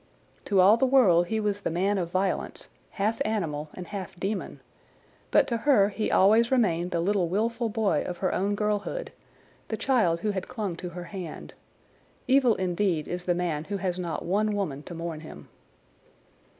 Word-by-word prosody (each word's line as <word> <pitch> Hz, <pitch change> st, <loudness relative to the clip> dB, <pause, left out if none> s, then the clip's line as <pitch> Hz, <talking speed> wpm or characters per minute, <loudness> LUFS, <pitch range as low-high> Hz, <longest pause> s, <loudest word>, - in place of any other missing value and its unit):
To 195 Hz, -, +2 dB
all 200 Hz, +5 st, +7 dB
the 265 Hz, -, +2 dB
world 190 Hz, -10 st, +5 dB
he 220 Hz, +3 st, -1 dB
was 205 Hz, -1 st, -1 dB
the -, -, -1 dB
man 190 Hz, +4 st, +1 dB
of 170 Hz, -2 st, -2 dB
violence, 185 Hz, +2 st, -2 dB, 0.2 s
half 215 Hz, +3 st, -1 dB
animal 160 Hz, -9 st, -2 dB
and 180 Hz, -, -7 dB
half 190 Hz, -2 st, -7 dB
demon; 195 Hz, +2 st, -3 dB, 0.7 s
but -, -, +4 dB
to 235 Hz, -, 0 dB
her 220 Hz, -5 st, +4 dB
he 215 Hz, +1 st, -2 dB
always 220 Hz, +5 st, +5 dB
remained 180 Hz, -9 st, +2 dB
the 170 Hz, -, -1 dB
little 185 Hz, 0 st, +1 dB
wilful 230 Hz, +5 st, 0 dB
boy 205 Hz, -8 st, +1 dB
of 180 Hz, -, -4 dB
her 185 Hz, -, -1 dB
own 200 Hz, +2 st, 0 dB
girlhood, 210 Hz, -, -2 dB, 0.6 s
the 220 Hz, -, -3 dB
child 215 Hz, -12 st, +2 dB
who 210 Hz, -, 0 dB
had 190 Hz, -2 st, -4 dB
clung 210 Hz, -7 st, -4 dB
to 180 Hz, -, -6 dB
her 175 Hz, +1 st, -7 dB
hand. 175 Hz, -2 st, -8 dB, 0.7 s
Evil 255 Hz, -4 st, +4 dB
indeed 180 Hz, -3 st, 0 dB
is 180 Hz, 0 st, -4 dB
the 175 Hz, -, +1 dB
man 165 Hz, -4 st, -2 dB
who 200 Hz, +3 st, -3 dB
has 185 Hz, -1 st, -2 dB
not 170 Hz, -2 st, -4 dB
one 210 Hz, +4 st, +1 dB
woman 155 Hz, -9 st, -2 dB
to 170 Hz, +3 st, -9 dB
mourn 165 Hz, -1 st, -5 dB
him. 155 Hz, -, -11 dB
195 Hz, 180 wpm, -27 LUFS, 175-215 Hz, 0.7 s, all